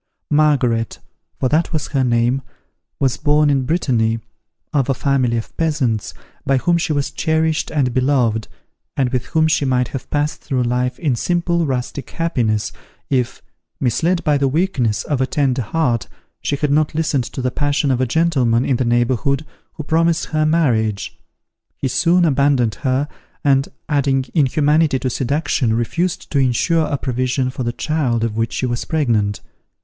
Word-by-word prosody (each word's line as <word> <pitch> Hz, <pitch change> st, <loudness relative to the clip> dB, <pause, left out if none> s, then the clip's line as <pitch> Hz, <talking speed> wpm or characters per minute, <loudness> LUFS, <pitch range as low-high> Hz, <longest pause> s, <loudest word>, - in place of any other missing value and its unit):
Margaret 135 Hz, -7 st, +2 dB, 0.4 s
(for 130 Hz, -, +1 dB
that 155 Hz, +4 st, +1 dB
was 155 Hz, -3 st, -2 dB
her 135 Hz, -2 st, +1 dB
name) 120 Hz, +2 st, +2 dB, 0.6 s
was 135 Hz, -3 st, +1 dB
born 150 Hz, 0 st, +3 dB
in 135 Hz, -2 st, +1 dB
Brittany, 120 Hz, -9 st, +1 dB, 0.6 s
of 140 Hz, -3 st, +1 dB
a 135 Hz, -, +2 dB
family 130 Hz, -4 st, +1 dB
of 115 Hz, -, -6 dB
peasants, 140 Hz, -10 st, -1 dB, 0.3 s
by 135 Hz, 0 st, +2 dB
whom 170 Hz, +6 st, +2 dB
she 165 Hz, -, -1 dB
was 140 Hz, -2 st, -1 dB
cherished 160 Hz, +1 st, 0 dB
and 135 Hz, -5 st, 0 dB
beloved, 125 Hz, -4 st, +1 dB, 0.5 s
and 130 Hz, -3 st, +2 dB
with 125 Hz, -2 st, -2 dB
whom 160 Hz, 0 st, +2 dB
she 160 Hz, -2 st, +1 dB
might 125 Hz, -2 st, +1 dB
have 135 Hz, -, -6 dB
passed 150 Hz, +1 st, -1 dB
through 130 Hz, -2 st, -1 dB
life 125 Hz, +1 st, -1 dB
in 145 Hz, -8 st, 0 dB
simple 170 Hz, +3 st, 0 dB
rustic 130 Hz, 0 st, -3 dB
happiness, 120 Hz, -11 st, -1 dB, 0.4 s
if, 125 Hz, -3 st, -1 dB, 0.4 s
misled 165 Hz, +8 st, +1 dB
by 145 Hz, -2 st, +2 dB
the 140 Hz, -, +2 dB
weakness 135 Hz, -, 0 dB
of 140 Hz, -3 st, -1 dB
a 130 Hz, -, +1 dB
tender 135 Hz, -2 st, 0 dB
heart, 120 Hz, -1 st, 0 dB, 0.3 s
she 145 Hz, -, -1 dB
had 145 Hz, 0 st, -1 dB
not 150 Hz, +1 st, +2 dB
listened 150 Hz, -5 st, 0 dB
to -, -, -7 dB
the 125 Hz, -1 st, 0 dB
passion 145 Hz, 0 st, 0 dB
of 130 Hz, -1 st, +1 dB
a 130 Hz, -, +1 dB
gentleman 130 Hz, -6 st, +2 dB
in 130 Hz, -, +1 dB
the 130 Hz, -, 0 dB
neighbourhood, 125 Hz, +4 st, +1 dB, 0.3 s
who 155 Hz, -, -6 dB
promised 165 Hz, +2 st, +1 dB
her 155 Hz, -1 st, 0 dB
marriage. 115 Hz, -11 st, +1 dB, 0.6 s
He 135 Hz, -, -2 dB
soon 175 Hz, +6 st, +3 dB
abandoned 140 Hz, -6 st, +2 dB
her, 135 Hz, 0 st, +1 dB, 0.4 s
and 135 Hz, -1 st, +3 dB, 0.2 s
adding 140 Hz, -3 st, +1 dB
inhumanity 150 Hz, 0 st, +3 dB
to 130 Hz, -1 st, -2 dB
seduction, 135 Hz, -3 st, 0 dB
refused 165 Hz, +10 st, -2 dB
to 140 Hz, -, +2 dB
insure 155 Hz, +6 st, +2 dB
a 145 Hz, -, -1 dB
provision 130 Hz, 0 st, -1 dB
for 130 Hz, -, -6 dB
the 120 Hz, -1 st, -1 dB
child 125 Hz, -4 st, -1 dB
of 115 Hz, -2 st, -1 dB
which 115 Hz, 0 st, -1 dB
she -, -, -1 dB
was 120 Hz, -1 st, -2 dB
pregnant. 115 Hz, -10 st, 0 dB
135 Hz, 165 wpm, -19 LUFS, 125-155 Hz, 0.6 s, born